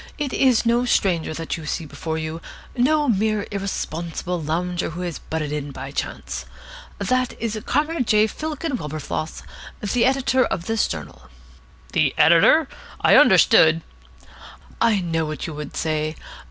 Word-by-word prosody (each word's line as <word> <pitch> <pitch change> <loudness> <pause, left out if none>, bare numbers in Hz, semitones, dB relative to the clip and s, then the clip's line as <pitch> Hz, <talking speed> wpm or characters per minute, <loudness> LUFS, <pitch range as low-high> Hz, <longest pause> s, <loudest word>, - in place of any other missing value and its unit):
"It 290 -4 -3
is 255 -4 +3
no 235 +1 +3
stranger 185 -10 +1
that 165 +1 -4
you 155 -2 -8
see 165 - -3
before 160 +2 -5
you, 160 +1 -4 0.3
no 295 +4 +2
mere 215 -2 +1
irresponsible 175 -3 -3
lounger 175 +3 -2
who 170 +3 -6
has 175 -3 -4
butted 155 -2 -4
in 150 -1 -3
by 135 0 -7
chance. - - -5 0.5
That 255 0 -1
is 225 -1 -2
Comrade 300 -4 0
J. 215 0 +5
Fillken 305 +3 -3
Wilberfloss, 155 +1 -5 0.4
the 230 +4 +1
editor 260 0 +2
of 175 -7 -3
this 225 +1 +1
journal." 75 -5 -8 0.6
"The - - +2
editor? - - +6 0.3
I - - +5
understood 160 +1 +6 0.5
" - - -17 0.2
"I 225 -4 +3
know 165 -2 -1
what 155 0 -5
you 160 - -5
would 150 -1 -7
say. 155 -1 -1
175 Hz, 150 wpm, -22 LUFS, 155-240 Hz, 0.6 s, editor